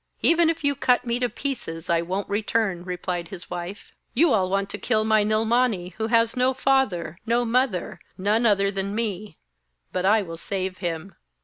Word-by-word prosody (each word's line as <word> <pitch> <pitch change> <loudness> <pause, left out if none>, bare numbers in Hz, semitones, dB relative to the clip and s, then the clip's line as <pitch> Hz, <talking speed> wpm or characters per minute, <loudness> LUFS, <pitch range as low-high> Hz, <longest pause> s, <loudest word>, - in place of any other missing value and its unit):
'Even 335 0 +5
if 330 -2 -2
you 285 0 +3
cut 250 -2 +2
me 235 0 0
to 245 -1 0
pieces, 225 - -5
I 170 -2 +2
won't 185 +4 -3
return,' 205 -3 0
replied 180 -1 -3
his 180 0 -10
wife. 180 +3 -6 0.2
'You 305 +1 +4
all 190 -4 +2
want 195 +1 -1
to 205 - -5
kill 215 +2 +1
my 215 -1 +3
Nilmani, 215 -3 +1
who 220 - 0
has 230 0 +3
no 255 +1 +2
father, 245 - +1
no 240 +1 +2
mother, 235 -5 0 0.2
none 215 +5 +2
other 200 -2 +3
than 200 +1 -3
me, 210 -4 -3 0.6
but 180 - -1
I 210 +2 +4
will 165 -2 -7
save 190 +1 -4
him.' 175 +1 -4
205 Hz, 185 wpm, -24 LUFS, 185-240 Hz, 0.6 s, Even